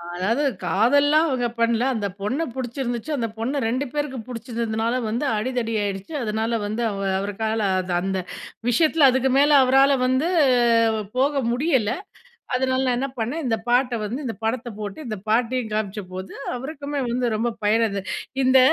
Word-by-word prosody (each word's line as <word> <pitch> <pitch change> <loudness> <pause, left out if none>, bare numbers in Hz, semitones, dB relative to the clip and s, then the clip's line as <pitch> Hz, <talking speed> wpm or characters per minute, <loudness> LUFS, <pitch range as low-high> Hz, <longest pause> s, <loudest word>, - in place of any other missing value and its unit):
அதாவது 220 +10 0 0.2
காதல்லாம் 285 - +4
அவுங்க 250 -3 0
பண்ல. 230 0 +2
அந்த 210 -3 -1
பொண்ண 250 +10 -1
பிடிச்சிருந்துச்சு, 245 +1 -3
அந்த 230 -3 -1
பொண்ண 265 +5 -1
2 255 +5 -1
பேருக்கு 290 -3 -2
பிடிச்சிருந்தனால, 230 -1 -2 0.2
வந்து 235 +6 -1
அடிதடி 230 0 -2
ஆயிடுச்சு. 200 +7 -4
அதனால 220 +1 -1
வந்து 215 +3 -2
அவ 195 -1 -4 0.2
அவருக்கால 220 +3 -2 0.2
அது 180 -1 -3
அந்த 190 0 -1 0.5
விஷயத்தில, 310 +3 +4
அதுக்கு 260 +1 +1
மேலே 290 +1 +5
அவரால 270 +2 +5
வந்து 260 +5 +2 0.9
போக 275 +1 +2
முடியல. 260 -5 +1 0.6
அதனால 260 +1 +1
நான் 250 -1 +1
என்ன 270 +2 -1
பண்ணேன், 255 +9 -2
இந்த 225 -3 +1
பாட்ட 245 +1 +2
வந்து 235 +6 -4
இந்த 230 - -2
படத்த 230 +2 -1
போட்டு, 205 +2 -5
இந்த 215 -2 -4
பாட்டையும் 235 +1 +1
காமிச்சபோது, 195 -3 -4 0.2
அவருக்குமே 285 +2 -5
வந்து 245 +1 0
ரொம்ப 230 +3 0
பயன் 220 +2 +3
அது, 200 -2 -3 0.4
இந்த 260 +1 +6
240 Hz, 150 wpm, -23 LUFS, 220-265 Hz, 0.9 s, இந்த